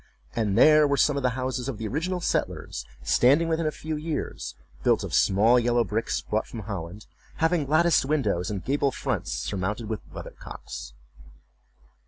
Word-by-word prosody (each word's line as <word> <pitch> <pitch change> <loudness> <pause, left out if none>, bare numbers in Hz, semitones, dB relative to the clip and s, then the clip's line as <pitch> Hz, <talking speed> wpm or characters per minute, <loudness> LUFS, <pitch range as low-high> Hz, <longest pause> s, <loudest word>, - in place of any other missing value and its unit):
and 105 -4 0
there 155 -1 +7
were 140 0 +1
some 145 - +3
of 140 - -1
the 125 -1 0
houses 130 0 -2
of 125 - -4
the 110 0 -4
original 170 - -2
settlers - - -2 0.2
standing 125 - +4
within 160 -1 0
a - - 0
few 155 +1 -5
years, 155 +1 -4 0.3
built - - +2
of - - -6
small 110 +6 +4
yellow 120 0 +2
bricks 110 +2 -2
brought 110 - -2
from 115 - -7
Holland, 100 -1 -6 0.3
having 160 -3 +1
latticed 160 -1 +3
windows 110 - 0
and 100 -3 -4
gable 140 +1 +1
fronts, 130 - -3
surmounted 105 +3 -3
with 110 - -2
weather - - -8
cocks. - - -8
125 Hz, 170 wpm, -26 LUFS, 105-150 Hz, 0.3 s, there